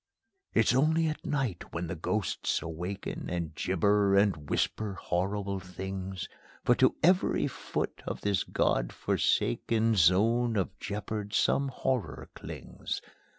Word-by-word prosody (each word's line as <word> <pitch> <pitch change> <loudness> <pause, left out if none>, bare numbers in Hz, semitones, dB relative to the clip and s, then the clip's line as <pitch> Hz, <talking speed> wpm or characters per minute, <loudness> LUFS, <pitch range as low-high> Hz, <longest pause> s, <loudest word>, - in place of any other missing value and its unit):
It's - - +4
only 160 +5 +3
at 155 -1 -2
night 130 - -2
when 85 +1 -1
the 85 - -4
ghosts 95 +4 -1
awaken, 85 +4 -5
And 85 -3 -3
gibber 100 +4 +2
and 100 -8 +2
whisper 105 -2 0
horrible 100 +2 -1
things; 95 0 -5 0.4
For - - +6
to - - +4
every 180 +3 +4
foot - - -3
of - - -4
this 100 -2 +1
God - - +1
forsaken 115 - +1
Zone 110 +6 +4
of 95 0 -1
jeopard 105 0 -4
some 140 - +3
horror 125 - -2
clings. - - -6
100 Hz, 125 wpm, -30 LUFS, 90-115 Hz, 0.4 s, For